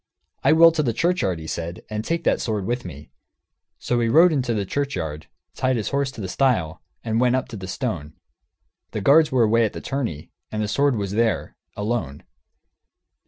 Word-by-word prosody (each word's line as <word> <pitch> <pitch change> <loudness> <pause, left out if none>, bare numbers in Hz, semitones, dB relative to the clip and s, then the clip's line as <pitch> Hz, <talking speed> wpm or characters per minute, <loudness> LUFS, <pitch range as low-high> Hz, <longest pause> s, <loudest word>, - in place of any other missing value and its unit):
"I - - +5
will 165 +1 +8
to 160 -1 0
the 120 -6 0
churchyard," 165 - +1
he 80 - -9
said, 85 +2 -5
"and 110 0 -4
take 170 +6 -2
that - - +2
sword 105 -4 -2
with 120 +1 -2
me." 75 -4 -10 0.7
So 120 - -1
he 115 -1 +1
rode 165 +6 +6
into 130 -4 0
the 100 -2 -1
churchyard, 90 - -3 0.3
tied 130 0 0
his 110 -4 -2
horse 140 -1 0
to 110 - -8
the 95 - -4
stile, 95 - 0 0.2
and 115 +1 0
went 125 0 +3
up 130 - -1
to 115 - -7
the 95 -3 -7
stone. 90 - -4 0.8
The 105 - -2
guards 150 +8 +5
were 130 -3 +3
away 115 +1 +3
to 110 - +3
the - - -8
tourney, 115 - -4 0.2
and 110 - -3
the 105 - 0
sword 140 +5 +2
was 100 -3 -3
there, 115 +2 0 0.2
alone. 105 - -3
115 Hz, 200 wpm, -23 LUFS, 95-135 Hz, 0.8 s, will